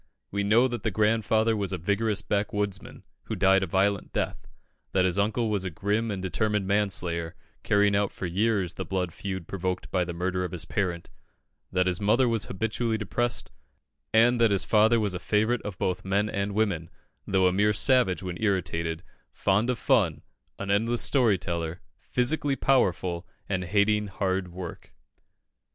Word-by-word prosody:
We 100 0 -1
know 115 +5 +4
that 120 -2 -4
the 110 - 0
grandfather 110 +1 +2
was 100 -3 -2
a 95 - -1
vigorous 100 +4 0
backwoodsman, 105 -1 -2 0.2
who - - -3
died 95 0 +4
a 95 - -1
violent 100 +3 0
death; - - -3 0.5
that 95 -1 +3
his 95 +1 +1
uncle 110 +2 0
was 100 -3 0
a 95 - -2
grim 105 +7 -1
and 95 -3 -4
determined 105 +1 0
manslayer, 95 -5 -1 0.3
carrying 100 0 +3
out 100 0 +1
for - - -6
years 95 0 0
the 95 - -5
blood 90 -2 -2
feud 95 -4 -5
provoked 90 -1 -3
by 90 -2 +1
the 90 - -4
murder 90 +2 -2
of 90 - -4
his 85 - -2
parent; 90 -4 -2 0.6
that 90 0 +2
his 90 +1 -1
mother 115 +5 +3
was 115 -4 +1
habitually 110 +3 -2
depressed, 120 +3 -2 0.6
and 120 +2 +4
that 115 - +5
his 100 -2 +1
father 110 +2 +4
was 105 -3 0
a 90 - -4
favourite 110 +5 +1
of 105 -3 -6
both 90 0 -2
men 100 +2 +1
and 100 -1 -2
women, 100 -7 0 0.4
though 95 -1 +2
a 90 - +3
mere 105 +2 +3
savage 105 -4 +2
when 90 0 -5
irritated, 85 -5 -1 0.3
fond 105 +5 +1
of 125 - 0
fun, 110 - +1 0.3
an 100 0 -3
endless 115 +4 +2
storyteller, 90 - +1 0.2
physically 135 +3 0
powerful, 95 -10 +1 0.2
and 95 -2 -2
hating 105 +2 +2
hard 95 -1 -1
work. 90 -1 -9
100 Hz, 170 wpm, -27 LUFS, 90-110 Hz, 0.6 s, that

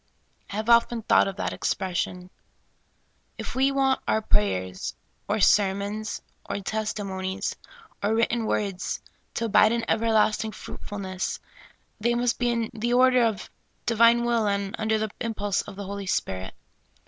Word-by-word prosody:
T - - -6
have 215 +1 -2
often 235 -1 +4
thought - - +4
of 195 - -4
that - - -2
expres 185 -2 -2
sion. 180 0 -4 1.1
If - - -5
we 265 +1 +3
want 270 -1 +2
our 220 - +3
prayers, 95 - 0 0.3
or 215 - 0
sermons, 205 +2 +2 0.3
or - - -1
testi 215 +1 -2
monies, 190 +1 -3 0.5
or 210 +2 +1
written 230 0 +1
words, 195 -4 -1 0.4
to 230 - -1
abide 215 0 +5
in 235 -1 -1
everlasting 220 -1 +2
fruit - - -9
fulness, 190 -2 -4 0.6
they 235 +2 +1
must 240 0 +1
be 245 -1 +2
in 230 -2 -1
the 235 +2 -1
order 255 -1 +5
of 220 -4 -1 0.3
Divine 235 +1 +5
will 235 -3 +2
and 200 -1 -1
under 220 0 +1
the 215 -1 -2
impulse 205 -3 -1
of 205 - -10
the 200 0 -6
Holy 200 0 -5
Spirit. 95 - -2
215 Hz, 155 wpm, -26 LUFS, 195-230 Hz, 1.1 s, abide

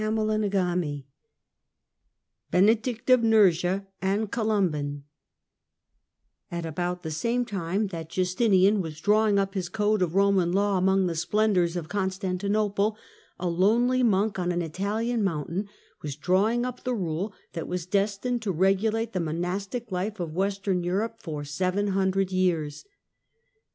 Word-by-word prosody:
CHAPTEK 215 -1 0
VII 175 -7 -1 1.4
BENEDICT 225 +7 +2
OF 255 -2 +6
NURSIA 195 -4 +3 0.2
AND 200 +3 0
COLUMBAN 175 -11 0 1.5
A 170 0 -3
T - - -4
about 175 +2 -3
the 160 - -4
same 235 +10 0
time 195 -1 -2
that 165 -3 -6
Justinian 190 +2 +3
was 160 -3 -6
drawing 210 +2 +3
up 195 0 0
his 185 -4 -3
Code 210 -1 +1
of 175 -1 0
Roman 195 -3 +3
Law 200 0 +2
among 190 +1 +3
the 175 - -1
splendours 180 0 +1
of 170 -3 -4
Constantinople, 200 +2 -1 0.4
a 180 - -2
lonely 230 +9 +3
monk 210 -3 +2
on 180 0 0
an 175 0 -1
Italian 210 +7 -1
mountain 175 +3 -2 0.3
was 145 -2 -5
drawing 205 +10 +1
up 250 -1 -6
the 250 -1 -1
rule 180 +1 -2 0.2
that 165 - -4
was 180 -2 -3
destined 205 +5 0
to 210 -3 -1
regulate 210 +6 +1
the 185 - -1
monastic 185 +8 -3
life 195 +3 -3
of 165 -3 -4
Western 195 0 -1
Europe 210 +6 -2
for 150 -4 -5
seven 185 +7 -1
hundred 190 0 +1
years. 175 - 0
195 Hz, 140 wpm, -26 LUFS, 175-215 Hz, 1.5 s, OF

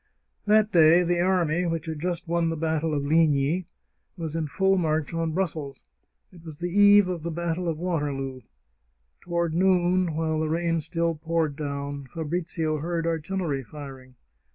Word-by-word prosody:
That 215 0 +4
day 170 +1 +6
the 175 0 0
army, 175 -2 +1
which 165 -1 -2
had 160 -2 -5
just 175 0 -3
won 170 0 +1
the 165 - -2
battle 160 0 -1
of 140 -1 -1
Ligny, 155 +2 +2 0.5
was 165 -2 -5
in 160 -2 -1
full 195 +6 +2
march 160 -3 0
on 165 -1 -1
Brussels. 155 -7 -3 0.5
It 170 -2 -15
was 160 -3 -9
the 175 +2 -4
eve 205 0 +6
of 180 -3 -3
the 170 - -4
battle 170 +1 -2
of 165 -2 -1
Waterloo. 145 -6 -3 0.8
Toward 170 -2 -1
noon, 180 -1 +2
while 160 -1 0
the 155 0 -1
rain 165 +1 0
still 165 +2 -1
poured 160 -1 -1
down, 140 -1 -5
Fabrizio 160 -1 -2
heard 165 +2 -2
artillery 165 -3 -2
firing. 130 -2 -11
165 Hz, 160 wpm, -26 LUFS, 155-175 Hz, 0.8 s, day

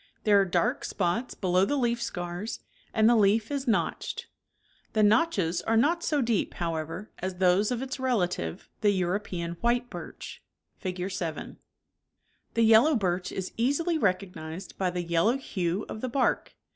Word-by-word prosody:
There 205 -2 +5
are - - +2
dark 175 -2 0
spots 200 +7 -1
below 185 -1 +2
the 285 - +1
leaf 235 -2 0
scars, 180 0 -4 0.3
and 220 0 +4
the 240 - +6
leaf 215 +3 +3
is 280 -2 -2
notched. 225 - -1 0.7
The 215 - +3
notches 205 - +3
are 225 0 +1
not 330 +9 +3
so 295 -5 +1
deep, 230 -4 0
how 170 -1 -2
ever, 165 +6 -5
as 185 0 -3
those 185 +3 +3
of 250 0 -2
its 265 0 -5
relative, 180 - -1
the 210 - +4
European 180 -2 -1
white 240 +1 +1
birch - - -8 0.4
(Fig. 185 0 -3
7). 165 -4 -5 1.0
The 230 - +4
yellow 225 +7 +6
birch 185 -4 -1
is 190 -1 -5
easily 300 +8 +1
recognized 185 - -2
by 185 -2 +1
the 180 0 -3
yel 170 +1 +1
low 240 +4 +3
hue 190 -6 -2
of 215 - -7
the 255 - -2
bark. 255 +2 0
200 Hz, 165 wpm, -28 LUFS, 180-235 Hz, 1.0 s, the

